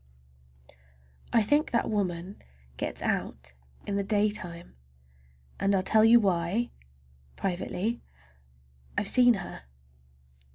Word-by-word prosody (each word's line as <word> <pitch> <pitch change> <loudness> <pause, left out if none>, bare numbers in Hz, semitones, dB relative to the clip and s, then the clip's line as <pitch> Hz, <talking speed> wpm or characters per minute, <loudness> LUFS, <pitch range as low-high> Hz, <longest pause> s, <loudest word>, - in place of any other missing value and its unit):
I 230 -2 +4
think 290 +8 +2
that 235 - 0
woman 190 -2 -3 0.3
gets - - -4
out 65 0 -3 0.3
in 200 -1 -2
the 200 - 0
daytime! 205 - -1 0.8
And 195 0 +2
I'll 185 - +1
tell 215 +2 +4
you 230 +2 +7
why—privately—I've 65 - -5
seen 245 0 +5
her! 180 - -8
185 Hz, 90 wpm, -28 LUFS, -, 0.8 s, you